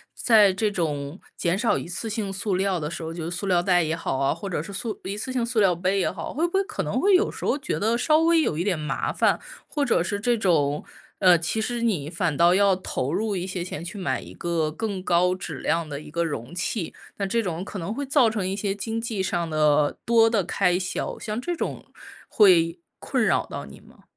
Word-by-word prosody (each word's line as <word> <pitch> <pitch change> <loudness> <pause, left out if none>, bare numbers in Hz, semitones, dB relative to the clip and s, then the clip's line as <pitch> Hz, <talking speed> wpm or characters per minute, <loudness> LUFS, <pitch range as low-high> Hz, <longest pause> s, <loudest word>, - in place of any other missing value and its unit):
在 215 -4 +5
这 205 +3 0
种 150 -3 -3 0.2
减 175 +1 0
少 220 +3 +2
一 - - -5
次 185 +6 -4
性 210 -2 -3
塑 200 0 -1
料 190 -1 0
的 150 -1 -3
时 165 - -6
候， 160 0 -5
就 165 -1 -5
是 - - -3
塑 180 +2 -4
料 180 -3 +3
袋 175 -1 +3
也 160 0 -1
好 165 - -2
啊， 135 +1 +2
或 200 - -6
者 170 -5 -2
是 200 - -9
塑 215 +2 -4
一 195 +2 -4
次 215 +5 -4
性 250 -2 0
塑 235 -1 0
料 190 -4 +4
杯 185 +3 0
也 185 - +1
好， 175 -3 -6
会 320 +5 +1
不 345 - -12
会 390 +1 +3
可 425 +2 -4
能 - - -1
会 400 +1 +4
有 375 +3 +4
时 - - -7
候 - - +2
觉 - - -2
得 220 +3 +2
稍 305 +6 +3
微 330 0 +4
有 155 - 0
一 170 - 0
点 190 -3 0
麻 150 - -2
烦， - - +2 0.3
或 290 -1 -1
者 175 - +2
是 200 +3 -2
这 240 +3 +2
种， 150 -8 +1 0.4
呃， 180 -2 +6
其 170 +7 -2
实 240 +2 -2
你 175 -11 0
反 165 -2 -1
倒 170 +3 +5
要 200 -1 +4
投 150 -6 -3
入 210 +2 0
一 180 -1 -2
些 185 -2 -3
钱 175 - -6
去 175 +4 -7
买 185 - -1
一 - - -11
个 165 -3 -1
更 200 +1 -4
高 180 0 +3
质 160 -6 -6
量 165 0 0
的 145 -2 -5
一 - - -11
个 170 +2 0
容 145 -4 -4
器， 180 0 -2 0.2
那 200 - -1
这 230 +4 +1
种 175 -2 -3
可 200 - -7
能 185 +5 -3
会 285 - -3
造 270 -3 +4
成 205 -4 -2
一 190 - -2
些 200 -1 -1
经 225 +3 -3
济 225 -3 -3
上 175 -3 -1
的 150 -1 +2
多 230 -1 +5
的 220 -4 +1
开 180 +1 +1
销， 185 0 -3
像 215 0 -3
这 350 +8 -3
种 - - -4 0.4
会 175 -5 +4 0.2
困 260 -4 0
扰 - - +2
到 - - -7
你 - - -13
吗？ - - -20
190 Hz, 270 characters per minute, -25 LUFS, 170-220 Hz, 0.4 s, 呃